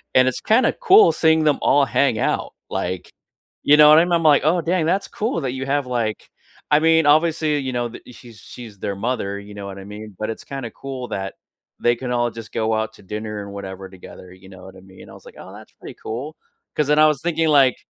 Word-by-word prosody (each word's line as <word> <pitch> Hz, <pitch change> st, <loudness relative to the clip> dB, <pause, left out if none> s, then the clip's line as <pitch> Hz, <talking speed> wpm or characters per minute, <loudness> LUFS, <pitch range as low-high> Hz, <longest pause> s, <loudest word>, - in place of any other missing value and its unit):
And 130 Hz, 0 st, +5 dB
it's 130 Hz, -, -1 dB
kinda 225 Hz, +4 st, +2 dB
cool 415 Hz, -2 st, +6 dB
seeing 160 Hz, -1 st, +2 dB
them 150 Hz, -2 st, +2 dB
all 145 Hz, -, +3 dB
hang 135 Hz, -4 st, +1 dB
out -, -, -2 dB, 0.2 s
like 90 Hz, 0 st, -4 dB, 0.5 s
you 145 Hz, -, +6 dB
know 150 Hz, 0 st, +8 dB
what 155 Hz, -, +8 dB
I 170 Hz, -, +3 dB
mean? 175 Hz, -, -2 dB
I'm 170 Hz, -, +2 dB
like, 150 Hz, -3 st, +5 dB
"Oh, 170 Hz, +3 st, +2 dB
dang, 170 Hz, 0 st, 0 dB
that's 185 Hz, +5 st, 0 dB
cool 210 Hz, -6 st, -3 dB
that 130 Hz, -3 st, -2 dB
you 130 Hz, +1 st, -5 dB
have, 140 Hz, 0 st, -1 dB
like" 120 Hz, -4 st, -3 dB, 0.4 s
I 150 Hz, -, +5 dB
mean, 160 Hz, 0 st, +3 dB
obviously, 155 Hz, 0 st, +2 dB
you 130 Hz, -2 st, -4 dB
know 120 Hz, -1 st, -2 dB
th 115 Hz, -, -12 dB
she's 115 Hz, -4 st, -15 dB
she's 110 Hz, -4 st, -12 dB
their 100 Hz, -, -4 dB
mother, 100 Hz, -2 st, -3 dB
you 100 Hz, +1 st, -12 dB
know 100 Hz, -1 st, -8 dB
what 100 Hz, 0 st, -8 dB
I 95 Hz, -, -9 dB
mean? 105 Hz, +1 st, -10 dB
But 110 Hz, -, -4 dB
it's 115 Hz, -, -7 dB
kinda 135 Hz, -4 st, -6 dB
cool 130 Hz, -3 st, -7 dB
that 95 Hz, -1 st, -4 dB, 0.5 s
they 120 Hz, 0 st, +2 dB
can 125 Hz, 0 st, -5 dB
all 120 Hz, -1 st, 0 dB
just 115 Hz, 0 st, -11 dB
go 110 Hz, 0 st, 0 dB
out 110 Hz, 0 st, -2 dB
to -, -, -18 dB
dinner 105 Hz, +1 st, -6 dB
and 100 Hz, -, -10 dB
whatever 95 Hz, -1 st, -8 dB
together, 90 Hz, -1 st, -13 dB
you 95 Hz, +1 st, -17 dB
know 95 Hz, -1 st, -14 dB
what 95 Hz, 0 st, -13 dB
I -, -, -14 dB
mean? 95 Hz, 0 st, -16 dB
I -, -, -13 dB
was -, -, -16 dB
like, -, -, -14 dB
"Oh, -, -, -11 dB
that's -, -, -14 dB
pretty -, -, -12 dB
cool." 135 Hz, +8 st, -6 dB, 0.4 s
'Cause 150 Hz, -, 0 dB
then 150 Hz, +1 st, +3 dB
I 155 Hz, -, +7 dB
was 150 Hz, -3 st, 0 dB
thinking 165 Hz, -1 st, 0 dB
like 140 Hz, -4 st, +4 dB
125 Hz, 250 wpm, -21 LUFS, 105-155 Hz, 0.5 s, know